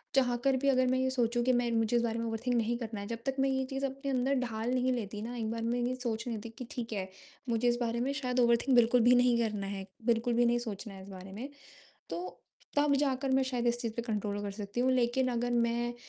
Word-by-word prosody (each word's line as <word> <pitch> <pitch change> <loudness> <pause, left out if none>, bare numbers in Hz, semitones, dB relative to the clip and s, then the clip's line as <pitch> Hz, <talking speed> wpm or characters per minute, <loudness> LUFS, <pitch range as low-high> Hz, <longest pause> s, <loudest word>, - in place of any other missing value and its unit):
चाहकर 255 0 +3
भी 280 - +3
अगर 255 -1 +3
मैं 260 +1 +2
यह 260 0 +1
सोचूँ 240 -2 +1
कि 255 - +3
मैं 240 -1 +1
मुझे 225 +1 +1
उस 235 - +1
बारे 230 0 -1
में 230 - -2
ओवरथिंक 230 +2 -1
नहीं 235 +1 +1
करना 225 -3 -5
है, 200 - -6
जब 230 0 -4
तक 270 0 -1
मैं 270 0 +3
यह 265 0 0
चीज़ 270 0 -2
अपने 275 +1 -3
अंदर 265 +2 +1
ढाल 230 -1 -2
नहीं 255 0 +2
लेती 210 -3 -4
ना, 240 +2 -5
एक 220 -1 -2
बार 230 0 -3
मैं 235 +2 0
यह 245 +1 0
सोच 230 0 -2
नहीं 230 -2 -2
लेती 225 +2 -7
कि 250 - -6
ठीक 230 -2 -4
है, 190 -2 -3 0.4
मुझे 235 +1 +1
इस 240 0 +3
बारे 235 0 0
में 270 +2 0
शायद 250 -3 -1
ओवरथिंक 235 +2 +4
बिल्कुल 240 +1 +5
भी 245 +2 +6
नहीं 245 -1 +4
करना 210 -3 -1
है, 195 -1 -5 0.2
बिल्कुल 235 0 +2
भी 240 +1 +3
नहीं 240 0 +3
सोचना 205 0 -6
है 190 - -10
इस 200 - -12
बारे 190 0 -9
में, 240 +8 -6 0.6
तो 175 +1 -5 0.4
तब 290 -1 +4
जाकर 270 -1 0
मैं 265 0 +4
शायद 245 -2 -2
इस 240 0 +1
चीज़ 230 -3 -2
पर 235 - -3
कंट्रोल 210 -3 -2
कर 200 - -3
सकती 205 +3 -4
हूँ, 260 +1 +3
लेकिन 255 +1 +2
अगर 245 0 -1
मैं 240 0 +1
240 Hz, 265 wpm, -31 LUFS, 225-255 Hz, 0.6 s, भी